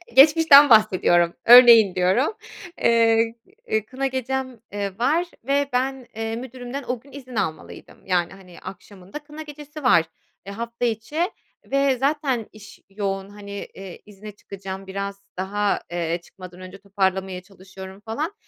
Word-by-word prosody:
Geçmişten 295 Hz, 0 st, +7 dB
bahsediyorum, 185 Hz, -6 st, +4 dB
örneğin 235 Hz, -5 st, +8 dB
diyorum. 190 Hz, -, +1 dB, 0.5 s
Eee, 230 Hz, 0 st, +3 dB, 0.5 s
kına 270 Hz, +1 st, -3 dB
gecem, 260 Hz, -1 st, -4 dB
ııı, 200 Hz, -2 st, -4 dB
var 310 Hz, +9 st, +1 dB, 0.2 s
ve 280 Hz, +2 st, 0 dB
ben, 260 Hz, 0 st, -2 dB
eee, 225 Hz, 0 st, -3 dB
müdürümden 255 Hz, +2 st, -7 dB
o 250 Hz, -1 st, -2 dB
gün 275 Hz, +4 st, -20 dB
izin 255 Hz, -3 st, -11 dB
almalıydım. 160 Hz, -7 st, -5 dB
Yani, 180 Hz, -1 st, 0 dB
hani, 185 Hz, -3 st, -15 dB
akşamında 190 Hz, +4 st, -10 dB
kına 300 Hz, +1 st, -11 dB
gecesi 295 Hz, 0 st, -10 dB
var, 170 Hz, -10 st, +4 dB, 0.4 s
e, 200 Hz, -, -7 dB
hafta 235 Hz, +3 st, -4 dB
içi 270 Hz, -, -2 dB, 0.3 s
ve 275 Hz, -1 st, +1 dB
zaten 270 Hz, -4 st, -1 dB
iş 210 Hz, -1 st, -15 dB
yoğun, 195 Hz, -1 st, -4 dB
hani, 205 Hz, 0 st, -11 dB, 0.2 s
eee, 190 Hz, -2 st, -10 dB
izne 210 Hz, +1 st, -11 dB
çıkacağım 195 Hz, -1 st, -9 dB
biraz 200 Hz, +1 st, -6 dB
daha, 205 Hz, +2 st, -1 dB
eee, 170 Hz, 0 st, -2 dB
çıkmadan 185 Hz, -1 st, -13 dB
önce 185 Hz, +1 st, -10 dB
toparlamaya 190 Hz, -2 st, -2 dB
çalışıyorum 190 Hz, 0 st, -12 dB
falan. 295 Hz, -, -3 dB
220 Hz, 135 wpm, -22 LUFS, 195-265 Hz, 0.5 s, örneğin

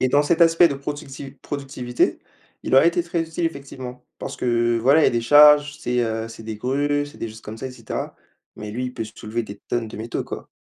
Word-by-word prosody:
Et 130 Hz, -, +2 dB
dans 145 Hz, +3 st, +4 dB
cet 165 Hz, +3 st, +1 dB
aspect 165 Hz, +1 st, +6 dB
de 140 Hz, -, -3 dB
productiv 140 Hz, -1 st, -7 dB
productivité, 135 Hz, -4 st, -2 dB, 0.4 s
il -, -, 0 dB
aurait 135 Hz, +5 st, +7 dB
été 170 Hz, 0 st, 0 dB
très 170 Hz, 0 st, -2 dB
utile 165 Hz, +1 st, -4 dB
effectivement 130 Hz, -5 st, -8 dB
parce -, -, -6 dB
que 120 Hz, -1 st, +1 dB
voilà, 140 Hz, +7 st, +4 dB
il -, -, +6 dB
y -, -, -2 dB
des 120 Hz, 0 st, 0 dB
charges, 150 Hz, +2 st, +7 dB
c'est, 125 Hz, 0 st, -1 dB
heu, 115 Hz, -1 st, -2 dB
c'est 115 Hz, 0 st, -11 dB
des 110 Hz, -1 st, -6 dB
grues, 145 Hz, +4 st, 0 dB
c'est 145 Hz, -, -14 dB
des 115 Hz, -, -4 dB
choses 110 Hz, +1 st, -11 dB
comme 110 Hz, +1 st, -8 dB
ça 130 Hz, -, -5 dB
et 130 Hz, -, -6 dB
cetera. -, -, -5 dB, 0.4 s
Mais 105 Hz, 0 st, -7 dB
lui 125 Hz, +4 st, -3 dB
il 125 Hz, -, -7 dB
peut 110 Hz, -, -3 dB
soulever 110 Hz, +2 st, -5 dB
des 100 Hz, -2 st, -10 dB
tonnes 120 Hz, -2 st, -1 dB
de -, -, -9 dB
métaux, 115 Hz, +2 st, -4 dB
quoi! -, -, -8 dB
130 Hz, 235 wpm, -22 LUFS, 115-145 Hz, 0.4 s, aurait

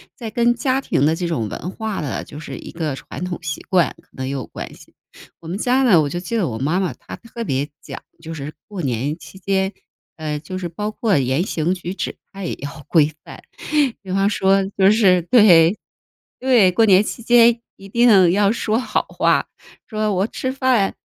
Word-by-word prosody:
在 230 Hz, -3 st, -6 dB
跟 235 Hz, +2 st, +2 dB
家 260 Hz, +2 st, 0 dB
庭 140 Hz, -, 0 dB
的 160 Hz, +1 st, +2 dB
这 175 Hz, 0 st, -3 dB
种 115 Hz, -11 st, -2 dB
文 180 Hz, -, -5 dB
化 220 Hz, -1 st, -4 dB
的， 130 Hz, -10 st, -3 dB
就 145 Hz, -, -10 dB
是 155 Hz, -, -7 dB
一 -, -, -10 dB
个 155 Hz, -5 st, -3 dB
传 140 Hz, +5 st, -7 dB
统 180 Hz, -1 st, -4 dB
习 155 Hz, -1 st, -4 dB
惯， 175 Hz, -7 st, +2 dB
可 -, -, -34 dB
能 130 Hz, 0 st, -5 dB
也 -, -, -3 dB
有 130 Hz, -4 st, -4 dB
关 -, -, -8 dB
系。 -, -, -18 dB, 0.5 s
我 165 Hz, -, -12 dB
们 180 Hz, +4 st, -3 dB
家 255 Hz, +4 st, +2 dB
呢， 210 Hz, -11 st, +5 dB
我 150 Hz, -, +1 dB
就 175 Hz, -, -3 dB
记 230 Hz, +6 st, -3 dB
得 195 Hz, -, +1 dB
我 110 Hz, -3 st, -4 dB
妈 155 Hz, +7 st, 0 dB
妈， 185 Hz, -, -1 dB
她 -, -, -10 dB
特 235 Hz, 0 st, -8 dB
别 140 Hz, -5 st, -1 dB
讲 -, -, -8 dB, 0.2 s
就 165 Hz, 0 st, -7 dB
是 145 Hz, +1 st, -6 dB
过 195 Hz, -6 st, -6 dB
年 135 Hz, +5 st, -1 dB
期 190 Hz, -, -13 dB
间， 190 Hz, +1 st, 0 dB, 0.4 s
呃， 155 Hz, -1 st, -3 dB
就 185 Hz, +5 st, -6 dB
是 175 Hz, -2 st, -4 dB
包 210 Hz, +5 st, -4 dB
括 215 Hz, -5 st, +1 dB
言 130 Hz, +4 st, +1 dB
行 170 Hz, -2 st, -1 dB
举 180 Hz, +1 st, -6 dB
止， -, -, -4 dB, 0.2 s
它 195 Hz, -1 st, -8 dB
也 -, -, -2 dB
要 145 Hz, +1 st, -8 dB
规 155 Hz, -3 st, +3 dB
范。 -, -, -11 dB, 0.6 s
比 190 Hz, -, -7 dB
方 195 Hz, +2 st, +2 dB
说 195 Hz, -1 st, +2 dB
就 195 Hz, +1 st, +6 dB
是 185 Hz, -6 st, +4 dB
对， 180 Hz, -5 st, +6 dB, 0.7 s
对， 240 Hz, -8 st, +4 dB
过 225 Hz, +5 st, +4 dB
年 190 Hz, -2 st, +6 dB
期 235 Hz, -, -6 dB
间 235 Hz, 0 st, +5 dB, 0.2 s
一 195 Hz, 0 st, -13 dB
定 200 Hz, -6 st, +5 dB
要 200 Hz, 0 st, +3 dB
说 220 Hz, -1 st, 0 dB
好 250 Hz, -, -1 dB
话。 -, -, +1 dB, 0.4 s
说 215 Hz, -1 st, -1 dB
我 190 Hz, +2 st, +1 dB
吃 260 Hz, -, -4 dB
饭， 255 Hz, -6 st, +1 dB
190 Hz, 230 characters per minute, -20 LUFS, 160-215 Hz, 0.7 s, 就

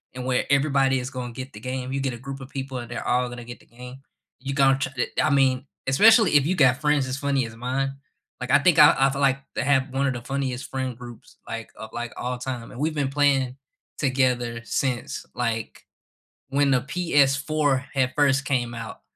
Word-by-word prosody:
and 130 Hz, -, -5 dB
where 125 Hz, -1 st, +1 dB
everybody 135 Hz, -2 st, +3 dB
is 125 Hz, -, -5 dB
going 125 Hz, -3 st, -6 dB
get 130 Hz, +2 st, -7 dB
the 105 Hz, -, -9 dB
game, 125 Hz, +2 st, -4 dB
you 135 Hz, -, -1 dB
get 135 Hz, -2 st, -2 dB
a 120 Hz, -, -7 dB
group 135 Hz, 0 st, -6 dB
of 135 Hz, -, -8 dB
people 135 Hz, -1 st, -5 dB
and 120 Hz, -1 st, -8 dB
they're 120 Hz, -, -5 dB
all 125 Hz, +1 st, +2 dB
gonna 120 Hz, 0 st, -8 dB
get 120 Hz, +1 st, -9 dB
the -, -, -21 dB
game, 125 Hz, +2 st, -11 dB, 0.5 s
you 140 Hz, -, -2 dB
gon 135 Hz, -1 st, +4 dB
ch 135 Hz, -, 0 dB
t 125 Hz, -, 0 dB, 0.2 s
I -, -, +2 dB
mean, 135 Hz, -1 st, +2 dB, 0.2 s
especially 215 Hz, -, +6 dB
if 140 Hz, -, +5 dB
you 180 Hz, +5 st, +1 dB
got 130 Hz, -5 st, +4 dB
friends 150 Hz, -3 st, +2 dB
as 130 Hz, +1 st, -3 dB
funny 140 Hz, -2 st, 0 dB
as 110 Hz, -, -12 dB
mine, 130 Hz, +3 st, -2 dB, 0.5 s
like, 125 Hz, +1 st, -3 dB
I -, -, +6 dB
think 170 Hz, +2 st, +3 dB
I 150 Hz, 0 st, +8 dB
I 135 Hz, +1 st, +5 dB
feel 140 Hz, +1 st, -3 dB
like 135 Hz, -1 st, +3 dB, 0.2 s
to -, -, -1 dB
have 135 Hz, 0 st, +2 dB
one 135 Hz, +1 st, +1 dB
of 135 Hz, -, 0 dB
the 120 Hz, -, -6 dB
funniest 130 Hz, 0 st, -3 dB
friend 130 Hz, -2 st, -3 dB
groups, 120 Hz, -2 st, -12 dB
like, 115 Hz, -1 st, -6 dB
of, 110 Hz, -, -8 dB
like, 120 Hz, 0 st, -5 dB
all 125 Hz, 0 st, -3 dB
time. 125 Hz, -2 st, -6 dB
We've 155 Hz, +4 st, -1 dB
been 140 Hz, -2 st, 0 dB
playing 135 Hz, -3 st, +2 dB, 0.4 s
together 125 Hz, -4 st, 0 dB
since, 125 Hz, -2 st, -2 dB
like, 115 Hz, -3 st, -3 dB, 0.6 s
when 140 Hz, +1 st, +2 dB
the 130 Hz, -2 st, +3 dB
PS4 140 Hz, -2 st, +1 dB
had 130 Hz, -2 st, +1 dB
first 145 Hz, -1 st, +2 dB
came 120 Hz, -3 st, -1 dB
out. 115 Hz, -1 st, -8 dB
135 Hz, 215 wpm, -24 LUFS, 125-140 Hz, 0.6 s, I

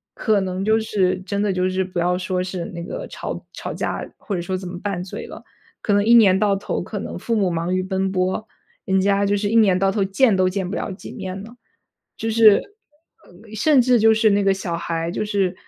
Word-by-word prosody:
可 215 Hz, -3 st, +1 dB
能 185 Hz, 0 st, -3 dB
就 220 Hz, +1 st, +3 dB
是 190 Hz, -4 st, 0 dB
真 200 Hz, +2 st, -3 dB
的 205 Hz, -2 st, +1 dB
就 185 Hz, 0 st, 0 dB
是 185 Hz, 0 st, 0 dB
不 185 Hz, -1 st, -4 dB
要 180 Hz, +1 st, +1 dB
说 180 Hz, 0 st, -2 dB
是 185 Hz, -2 st, -4 dB
那 170 Hz, -1 st, -7 dB
个 -, -, -6 dB
吵 -, -, -6 dB
吵 -, -, -6 dB
架 -, -, -3 dB
或 200 Hz, -, -5 dB
者 175 Hz, -, -2 dB
说 185 Hz, +2 st, -3 dB
怎 185 Hz, 0 st, -7 dB
么 175 Hz, 0 st, -7 dB
拌 195 Hz, -4 st, -3 dB
嘴 185 Hz, -, -7 dB
了， -, -, -10 dB, 0.4 s
可 205 Hz, -, +1 dB
能 205 Hz, 0 st, +3 dB
一 230 Hz, +3 st, +5 dB
年 200 Hz, -5 st, +6 dB
到 205 Hz, -1 st, +2 dB
头 195 Hz, -, -3 dB
可 205 Hz, +4 st, -6 dB
能 200 Hz, -, -5 dB
父 230 Hz, -, -1 dB
母 195 Hz, -4 st, +1 dB
忙 170 Hz, +2 st, -1 dB
于 185 Hz, -, 0 dB
奔 190 Hz, 0 st, -1 dB
波， 185 Hz, +3 st, -1 dB, 0.4 s
人 190 Hz, 0 st, +1 dB
家 200 Hz, +1 st, +2 dB
就 205 Hz, +1 st, +1 dB
是 205 Hz, 0 st, -1 dB
一 225 Hz, -, -1 dB
年 205 Hz, -5 st, +5 dB
到 195 Hz, +1 st, +2 dB
头 200 Hz, 0 st, 0 dB
见 195 Hz, +3 st, +3 dB
都 185 Hz, 0 st, +2 dB
见 190 Hz, -1 st, -3 dB
不 195 Hz, -, -4 dB
了 -, -, -3 dB
几 190 Hz, -, -9 dB
面 190 Hz, -3 st, -6 dB
了。 230 Hz, +3 st, -12 dB, 0.6 s
就 225 Hz, -, -2 dB
是 220 Hz, -2 st, +6 dB, 0.9 s
甚 280 Hz, +5 st, +4 dB
至 250 Hz, 0 st, +4 dB
就 220 Hz, 0 st, +5 dB
是 220 Hz, 0 st, +3 dB
那 200 Hz, 0 st, +2 dB
个 195 Hz, -, +4 dB
小 185 Hz, -3 st, -4 dB
孩， 165 Hz, 0 st, -3 dB
就 175 Hz, -, -3 dB
是 200 Hz, -3 st, 0 dB
195 Hz, 255 characters per minute, -21 LUFS, 185-210 Hz, 0.9 s, 年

